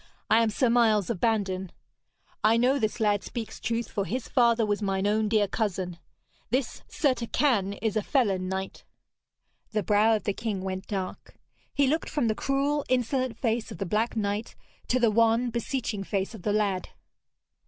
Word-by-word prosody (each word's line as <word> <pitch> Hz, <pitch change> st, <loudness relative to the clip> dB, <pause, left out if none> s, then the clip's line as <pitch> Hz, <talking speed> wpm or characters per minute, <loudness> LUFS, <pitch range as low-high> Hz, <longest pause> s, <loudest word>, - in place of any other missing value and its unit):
'I 225 Hz, -, +6 dB
am 225 Hz, -, +2 dB
Sir 245 Hz, +4 st, +1 dB
Miles 230 Hz, -4 st, +3 dB
of 205 Hz, -, -4 dB
Bandon. 190 Hz, -5 st, 0 dB, 0.7 s
I 220 Hz, +2 st, +5 dB
know 255 Hz, +4 st, +3 dB
this 215 Hz, 0 st, -1 dB
lad 205 Hz, -2 st, +2 dB
speaks 230 Hz, -3 st, -6 dB
truth, 230 Hz, -1 st, -2 dB
for 200 Hz, -, -2 dB
his 250 Hz, +4 st, -3 dB
father 235 Hz, -3 st, +3 dB
was 210 Hz, 0 st, -1 dB
mine 195 Hz, -1 st, 0 dB
own 215 Hz, +1 st, +2 dB
dear 210 Hz, -2 st, +3 dB
cousin. 185 Hz, -5 st, -2 dB, 0.5 s
This 255 Hz, +2 st, -1 dB
Sir 285 Hz, -5 st, +1 dB
Turquine 235 Hz, -4 st, +1 dB
is 220 Hz, -3 st, 0 dB
a 215 Hz, -, +2 dB
felon 195 Hz, -7 st, +1 dB
knight.' 190 Hz, 0 st, -4 dB, 0.9 s
The 215 Hz, -1 st, +1 dB
brow 210 Hz, +4 st, +4 dB
of 215 Hz, -, -3 dB
the 205 Hz, -, 0 dB
king 205 Hz, -3 st, -3 dB
went 190 Hz, 0 st, -4 dB
dark. 190 Hz, -3 st, -5 dB, 0.4 s
He 280 Hz, -, +2 dB
looked 310 Hz, +5 st, 0 dB
from 280 Hz, -7 st, 0 dB
the -, -, +2 dB
cruel 280 Hz, +4 st, 0 dB
insolent 255 Hz, -1 st, 0 dB
face 230 Hz, -2 st, -1 dB
of -, -, -7 dB
the 195 Hz, -, -3 dB
black 215 Hz, +6 st, 0 dB
knight 210 Hz, +1 st, -2 dB, 0.3 s
to 255 Hz, -, +2 dB
the 235 Hz, -3 st, +4 dB
wan 230 Hz, +2 st, +3 dB
beseeching 235 Hz, -3 st, -2 dB
face 195 Hz, +2 st, -2 dB
of 220 Hz, -, -9 dB
the 205 Hz, -, 0 dB
lad. 200 Hz, -3 st, 0 dB
220 Hz, 180 wpm, -27 LUFS, 200-240 Hz, 0.9 s, I